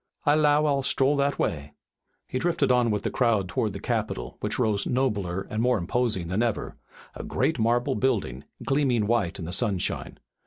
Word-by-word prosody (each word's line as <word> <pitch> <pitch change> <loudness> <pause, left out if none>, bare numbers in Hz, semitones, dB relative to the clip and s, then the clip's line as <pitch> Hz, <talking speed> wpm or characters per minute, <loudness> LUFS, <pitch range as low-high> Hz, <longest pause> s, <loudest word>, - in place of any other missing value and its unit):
I 145 - +5
'low 150 0 +3
I'll 140 -2 +2
stroll 135 +1 +2
that 140 0 +1
way." 75 -2 -2 0.5
He 130 - -3
drifted 165 -4 +1
on 125 -1 +3
with 105 -2 -1
the - - -2
crowd 110 -6 +1
toward - - -1
the - - -6
Capitol, - - -3
which - - -3
rose 105 -2 +1
nobler 100 -9 -1
and 110 - -2
more 125 0 +3
imposing 95 -1 -1
than 95 +6 -1
ever, 115 -3 -2 0.4
a - - -7
great - - -1
marble 120 +2 +2
building, 100 - -1 0.2
gleaming 135 -6 +1
white 105 -6 0
in 85 - -6
the 85 - -5
sunshine. 95 -2 -1
120 Hz, 185 wpm, -26 LUFS, 100-135 Hz, 0.5 s, I